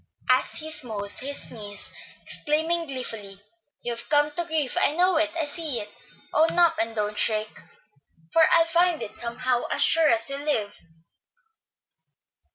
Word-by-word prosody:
as -, -, +3 dB
he 315 Hz, 0 st, -4 dB
smote 210 Hz, -8 st, -2 dB
his 280 Hz, +2 st, -2 dB
knees 205 Hz, -3 st, -7 dB, 0.3 s
exclaiming 320 Hz, +3 st, -1 dB
gleefully, 225 Hz, -7 st, -5 dB, 0.4 s
"You've 235 Hz, -1 st, -5 dB
come 295 Hz, 0 st, +3 dB
to 345 Hz, +3 st, -2 dB
grief! 315 Hz, -5 st, -2 dB
I 295 Hz, -, +2 dB
know 360 Hz, 0 st, +3 dB
it, 315 Hz, 0 st, +2 dB
I 330 Hz, -2 st, 0 dB
see 295 Hz, -4 st, -3 dB
it. 210 Hz, -, -8 dB, 0.4 s
Own 320 Hz, +2 st, +2 dB
up, 340 Hz, -2 st, +5 dB
and 225 Hz, 0 st, -3 dB
don't 210 Hz, -1 st, -2 dB
shirk, 215 Hz, -1 st, 0 dB, 0.7 s
for 330 Hz, -, +5 dB
I'll 330 Hz, 0 st, +5 dB
find 340 Hz, 0 st, +2 dB
it 210 Hz, -, -7 dB
out -, -, -5 dB
somehow, 240 Hz, +1 st, -1 dB
as -, -, +3 dB
sure 320 Hz, -2 st, +6 dB
as 230 Hz, 0 st, +2 dB
you 275 Hz, -, -3 dB
live." 280 Hz, -9 st, -1 dB
285 Hz, 160 wpm, -25 LUFS, 225-320 Hz, 0.7 s, sure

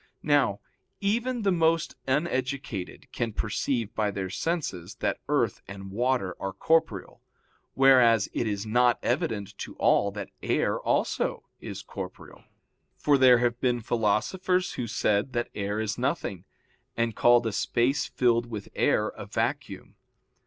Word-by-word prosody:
Now -, -, +2 dB, 0.4 s
even 235 Hz, +4 st, 0 dB
the 195 Hz, -, +3 dB
most 165 Hz, -2 st, +1 dB
uneducated 130 Hz, -, -2 dB
can 115 Hz, -2 st, -3 dB
perceive 115 Hz, +2 st, -2 dB
by 105 Hz, -1 st, 0 dB
their 95 Hz, -2 st, -4 dB
senses 105 Hz, -, -3 dB
that -, -, -2 dB
earth -, -, +1 dB
and 95 Hz, 0 st, -9 dB
water 120 Hz, -4 st, 0 dB
are 95 Hz, -1 st, -4 dB
corporeal, 160 Hz, -, 0 dB, 0.5 s
whereas 125 Hz, -5 st, +5 dB
it 120 Hz, -, -1 dB
is 100 Hz, 0 st, -2 dB
not 120 Hz, +2 st, +3 dB
evident 100 Hz, -2 st, -1 dB
to -, -, -7 dB
all 100 Hz, -, +3 dB
that 105 Hz, -, -6 dB
air -, -, 0 dB
also -, -, 0 dB, 0.2 s
is -, -, -7 dB
corporeal, -, -, -9 dB, 0.5 s
for 145 Hz, -, +3 dB
there 130 Hz, -2 st, +7 dB
have 120 Hz, 0 st, +1 dB
even 125 Hz, -2 st, +2 dB
been 120 Hz, -, -6 dB
philosophers 180 Hz, -, 0 dB
who 125 Hz, -, -4 dB
said 105 Hz, +3 st, 0 dB
that 120 Hz, -1 st, -2 dB
air 100 Hz, +1 st, -2 dB
is 110 Hz, +1 st, -2 dB
nothing, 120 Hz, -, -2 dB, 0.5 s
and 115 Hz, -2 st, 0 dB
called 120 Hz, 0 st, +5 dB
a 115 Hz, -, 0 dB
space 120 Hz, +6 st, +1 dB
filled 120 Hz, -1 st, +1 dB
with 110 Hz, -4 st, -7 dB
air -, -, +2 dB
a -, -, -9 dB
vacuum. -, -, -3 dB
120 Hz, 145 wpm, -27 LUFS, 105-135 Hz, 0.5 s, there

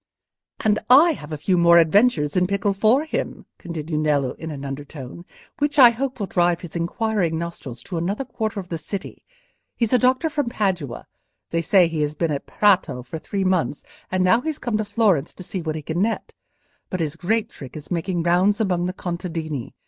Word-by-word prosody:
"And 215 Hz, -1 st, +2 dB
I 295 Hz, +7 st, +8 dB
have 155 Hz, -, -7 dB
a 155 Hz, -, -3 dB
few 180 Hz, +4 st, +1 dB
more 170 Hz, 0 st, +6 dB
adventures 165 Hz, -3 st, +3 dB
in 180 Hz, 0 st, +3 dB
pickle 200 Hz, +1 st, 0 dB
for 220 Hz, +9 st, +3 dB
him," 315 Hz, -, -4 dB
continued 160 Hz, -2 st, -4 dB
Nello, 145 Hz, -4 st, +1 dB
in 160 Hz, -, -8 dB
an 140 Hz, -2 st, -6 dB
undertone, 140 Hz, +3 st, -8 dB, 0.3 s
"which 290 Hz, +1 st, 0 dB
I 245 Hz, -4 st, +9 dB
hope 260 Hz, +2 st, -3 dB
will 205 Hz, -, -1 dB
drive 175 Hz, -2 st, +1 dB
his 175 Hz, -2 st, -9 dB
inquiring 175 Hz, -1 st, 0 dB
nostrils 160 Hz, -8 st, -6 dB
to 175 Hz, -3 st, -4 dB
another 200 Hz, +10 st, -2 dB
quarter 220 Hz, -4 st, -3 dB
of 180 Hz, -2 st, -8 dB
the 165 Hz, -, -3 dB
city. 200 Hz, +4 st, -7 dB, 0.5 s
He's 230 Hz, 0 st, 0 dB
a 250 Hz, -, +5 dB
doctor 255 Hz, +5 st, +3 dB
from 290 Hz, -5 st, -1 dB
Padua; 180 Hz, -, -2 dB, 0.5 s
they 165 Hz, -, +1 dB
say 180 Hz, +2 st, +4 dB
he 165 Hz, -2 st, -2 dB
has 150 Hz, 0 st, -1 dB
been 165 Hz, -1 st, 0 dB
at 140 Hz, -, -4 dB
Prato 180 Hz, -11 st, +2 dB
for 130 Hz, +6 st, -7 dB
three 195 Hz, +4 st, -3 dB
months, 185 Hz, -5 st, 0 dB, 0.3 s
and 185 Hz, 0 st, +1 dB
now 230 Hz, +6 st, +4 dB
he's 315 Hz, +1 st, -3 dB
come 240 Hz, -7 st, -1 dB
to 215 Hz, -, -2 dB
Florence 200 Hz, -10 st, +1 dB
to 185 Hz, -, -9 dB
see 185 Hz, +1 st, -5 dB
what 160 Hz, -1 st, -3 dB
he 155 Hz, -, -5 dB
can 160 Hz, +4 st, -2 dB
net. 220 Hz, +2 st, -1 dB, 0.6 s
But 185 Hz, -, -3 dB
his 155 Hz, -2 st, -2 dB
great 210 Hz, +6 st, -1 dB
trick 135 Hz, +1 st, -10 dB
is 150 Hz, -, -11 dB
making 175 Hz, 0 st, -1 dB
rounds 185 Hz, +5 st, +3 dB
among 180 Hz, -5 st, 0 dB
the 185 Hz, -, -3 dB
contadini. 165 Hz, -7 st, -5 dB
180 Hz, 200 wpm, -22 LUFS, 160-215 Hz, 0.6 s, I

